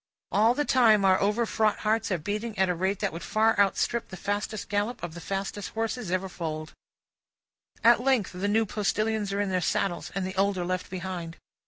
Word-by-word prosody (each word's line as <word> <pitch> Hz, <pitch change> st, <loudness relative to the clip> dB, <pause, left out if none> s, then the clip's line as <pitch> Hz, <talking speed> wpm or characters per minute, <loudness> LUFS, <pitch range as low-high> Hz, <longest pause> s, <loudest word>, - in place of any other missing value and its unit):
All 220 Hz, +4 st, +4 dB
the 295 Hz, -, 0 dB
time, 220 Hz, -7 st, +5 dB
our 190 Hz, -1 st, +5 dB
overfraught 215 Hz, 0 st, +1 dB
hearts 220 Hz, 0 st, +1 dB
are 185 Hz, -, +2 dB
beating 210 Hz, +6 st, -4 dB
at 190 Hz, 0 st, +3 dB
a -, -, +2 dB
rate 190 Hz, +3 st, -1 dB
that -, -, -1 dB
would 165 Hz, -, -6 dB
far 220 Hz, +1 st, +2 dB
outstrip 205 Hz, +4 st, +1 dB
the 190 Hz, -, -8 dB
fastest 205 Hz, +2 st, -3 dB
gallop 215 Hz, +3 st, -2 dB
of 160 Hz, -, -4 dB
the 170 Hz, -, -8 dB
fastest 195 Hz, +2 st, -4 dB
horses 225 Hz, -1 st, -2 dB
ever 185 Hz, +1 st, 0 dB
foaled. 160 Hz, -3 st, -5 dB, 1.1 s
At 235 Hz, 0 st, +6 dB
length 255 Hz, -6 st, +2 dB
the 185 Hz, +3 st, -2 dB
new 220 Hz, +2 st, +2 dB
postilions 215 Hz, 0 st, -1 dB
are 200 Hz, -, -1 dB
in 200 Hz, -2 st, -1 dB
their 185 Hz, -1 st, +1 dB
saddles, 175 Hz, +1 st, -1 dB
and 195 Hz, -1 st, -1 dB
the 190 Hz, +1 st, -5 dB
old 195 Hz, 0 st, +2 dB
are 175 Hz, -, -2 dB
left 185 Hz, 0 st, -3 dB
behind. 180 Hz, -3 st, -5 dB
200 Hz, 200 wpm, -27 LUFS, 185-220 Hz, 1.1 s, At